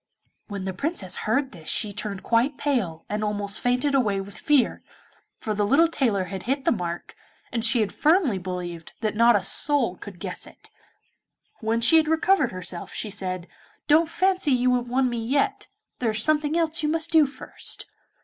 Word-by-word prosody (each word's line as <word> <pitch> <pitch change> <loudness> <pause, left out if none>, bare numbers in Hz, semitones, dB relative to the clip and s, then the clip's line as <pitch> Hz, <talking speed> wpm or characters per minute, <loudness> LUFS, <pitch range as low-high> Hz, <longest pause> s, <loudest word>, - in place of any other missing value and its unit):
When 200 -3 -5
the 190 - -3
Princess 195 - -2
heard 265 +5 0
this 160 -5 -10
she 210 -3 0
turned 200 -1 -4
quite 245 +4 +2
pale, 215 - -1
and 210 +1 -2
almost 205 -1 -2
fainted 250 +4 +1
away 215 -8 +2
with 195 +1 -8
fear, 290 -5 +2 0.6
for 215 - -3
the 210 0 0
little 280 +11 +5
tailor 235 - +1
had 190 0 -6
hit 275 0 0
the - - +4
mark, 175 -5 -4 0.4
and 230 -2 -1
she 230 +1 +3
had 210 - -1
firmly 305 - +3
believed 175 -2 -6
that 215 -2 0
not 235 +1 +5
a 200 - +1
soul 255 -1 +2
could 190 -1 -11
guess - - -5
it. - - -13 0.9
When 225 +1 0
she 245 +8 +6
had 315 -1 +3
recovered 320 -2 +3
herself 180 -1 -6
she 215 - -3
said, 185 -3 -3 0.4
'Don't 315 +2 +4
fancy 370 -2 +1
you 250 0 +3
have 245 -1 -1
won 255 +1 +2
me 235 -2 -3
yet, 275 +5 0 0.3
there 240 - +1
is 215 0 -1
something 305 +2 +2
else 325 -1 0
you 300 - 0
must 325 +1 -1
do 315 -3 +6
first. 275 - -6
230 Hz, 190 wpm, -25 LUFS, 200-290 Hz, 0.9 s, she